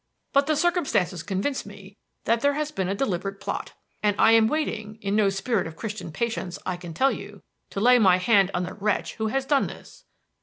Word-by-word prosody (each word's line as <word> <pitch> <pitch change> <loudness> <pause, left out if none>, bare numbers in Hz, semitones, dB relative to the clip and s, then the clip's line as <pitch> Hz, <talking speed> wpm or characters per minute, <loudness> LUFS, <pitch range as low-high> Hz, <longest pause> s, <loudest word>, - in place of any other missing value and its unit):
But 280 0 +4
the 310 - +2
circumstances 285 - +1
convince 205 +10 -2
me 200 -1 -13 0.3
that 230 +1 +1
there 285 +1 +2
has 300 0 -2
been 190 -10 -2
a 195 - 0
deliberate 195 -4 -2
plot; - - -4 0.3
and 210 -1 +2
I 225 - +6
am 225 -1 +6
waiting 220 -7 -2
in 200 -1 -2
no 210 -2 +4
spirit 195 +1 -1
of 160 - -9
Christian 210 -3 -6
patience, 220 -1 -3
I 185 - -1
can 175 -2 -9
tell 270 +7 +3
you - - -8 0.3
to - - -4
lay 245 +3 +6
my 185 -5 +5
hand 195 0 +4
on 180 - 0
the 180 - -5
wretch 210 0 -1
who 220 -1 -1
has 270 +4 -1
done 275 -1 +2
this." - - -12
210 Hz, 215 wpm, -25 LUFS, 195-255 Hz, 0.3 s, I